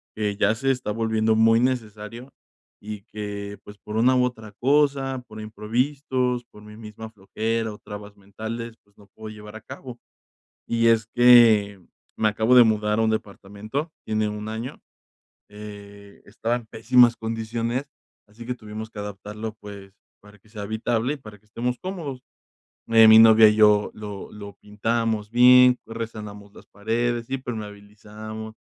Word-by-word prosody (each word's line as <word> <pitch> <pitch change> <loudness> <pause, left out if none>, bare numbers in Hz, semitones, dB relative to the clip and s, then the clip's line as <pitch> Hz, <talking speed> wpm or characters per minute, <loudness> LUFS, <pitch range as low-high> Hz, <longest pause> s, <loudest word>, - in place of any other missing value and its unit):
que 105 -2 -2
ya 105 +1 +2
se 135 +2 0
está 125 -5 -3
volviendo 110 0 +1
muy 115 +1 +4
necesario, 120 0 -3 0.5
y 105 -1 -8
que, 100 -1 -6
pues, 105 0 -12
por 105 +2 -7
una 130 +3 +4
u 125 - +3
otra 110 -4 -5
cosa, 135 0 +1
por 110 -1 -10
imprevistos, 125 +3 -2
por 105 - -17
mi 105 0 -13
misma 110 0 -10
flojera 110 +2 -3
o - - -11
trabas 105 0 -10
mentales, 110 +4 -7
pues, 100 - -34
no 100 - -19
puedo 110 +3 -12
llevar 105 +1 -11
a - - -13
cabo. 130 -3 -10 0.7
Y 115 0 +2
es 115 -2 +3
que, 115 -5 +5 0.4
me 110 - +1
acabo 110 +4 +3
de 120 - +9
mudar 105 -1 +1
a - - +2
un 110 - +2
departamento, 110 +8 -5
tiene 110 0 -1
1 105 0 -6
año. 110 +4 -6 0.7
Eh, 100 -1 -12
estaba 115 +3 -2
en 120 -2 -6
pésimas 120 +2 +4
condiciones, 115 +3 -3 0.4
así 110 +3 -13
que 125 - -2
tuvimos 110 -1 -8
que 105 - -16
adaptarlo, 105 +2 -7
pues, 100 -2 -11 0.3
para 105 0 -19
que 105 - -26
sea 105 -2 -8
habitable 115 +4 -1
y - - -7
para 110 -6 -13
que 105 - -34
estemos 120 +4 -3
cómodos, 160 -9 -6 0.6
eh, 115 -1 +6
mi 110 0 +9
novia 110 -1 +8
y 105 - +1
yo 105 -1 +4
lo 105 -2 -9
lo 100 -2 -10
pintamos 110 +1 -2
bien, 125 +1 +6
lo - - -12
resanamos 105 -3 -8
las - - -15
paredes, 115 +3 -2
impermeabilizamos, 110 -3 -8
110 Hz, 160 wpm, -24 LUFS, 105-120 Hz, 0.7 s, de